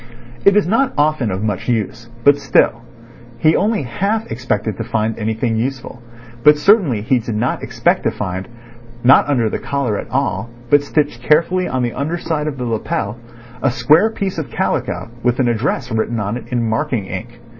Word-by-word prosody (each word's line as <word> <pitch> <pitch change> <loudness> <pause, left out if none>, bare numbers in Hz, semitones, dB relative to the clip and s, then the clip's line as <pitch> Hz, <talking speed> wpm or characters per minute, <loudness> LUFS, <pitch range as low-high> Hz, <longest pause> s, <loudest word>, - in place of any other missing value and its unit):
It 200 +1 +6
is 210 - +3
not 240 +9 +1
often 145 -5 +2
of 95 +1 -3
much 105 +1 -2
use, 115 0 -2
but 145 +1 +5
still—He 120 +3 0
only 210 -5 +1
half 200 - -1
expected 110 -3 -2
to - - -3
find 110 0 -1
anything 110 +1 -1
useful, 125 0 -4 0.4
but 150 +3 +6
certainly 150 - +3
he 125 +2 +2
did 115 -1 -4
not 115 +4 -1
expect - - 0
to - - +4
find—not 120 +6 0
under 120 -6 +2
the - - -2
collar 135 -7 -1
at - - -7
all, 130 -3 -1 0.2
but 145 - +6
stitched 145 -4 -1
carefully 170 +7 +2
on 130 -1 -1
the 120 - -1
under 155 +5 -2
side 155 -3 -2
of 145 -3 -3
the 125 - -3
lapel—a 120 +3 -4
square 145 - +4
piece 195 -5 -3
of 155 - -5
calico 115 - -2
with 125 0 +1
an 130 - +3
address 120 +2 -1
written 110 +1 -1
on 105 +1 -2
it 125 - -7
in 120 -2 -1
marking 115 -2 -1
ink. 115 +6 -7
120 Hz, 175 wpm, -18 LUFS, 115-145 Hz, 0.4 s, It